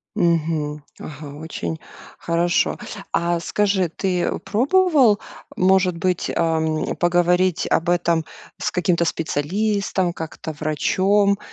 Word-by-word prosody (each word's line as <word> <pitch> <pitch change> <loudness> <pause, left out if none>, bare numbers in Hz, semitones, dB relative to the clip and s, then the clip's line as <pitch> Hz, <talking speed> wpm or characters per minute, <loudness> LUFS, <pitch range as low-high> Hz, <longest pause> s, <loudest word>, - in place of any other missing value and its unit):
Мгм. 155 -3 0 0.2
Ага. 145 -1 -8
Очень 85 - -5 0.4
хорошо. 170 +1 +1 0.4
А 170 0 +1
скажи, 195 -1 +1
ты 180 +1 -1
пробовал, 260 - +3 0.4
может 185 -1 +3
быть, 180 +1 -1
ам, 160 -1 0
поговорить 175 0 +2
об 170 +2 +1
этом 170 -2 +1 0.3
с - - -2
каким-то 175 -1 +1
специалистом, 190 +4 -1
как-то 160 -1 -6
врачом? 190 +7 +1
175 Hz, 100 wpm, -21 LUFS, 160-190 Hz, 0.4 s, пробовал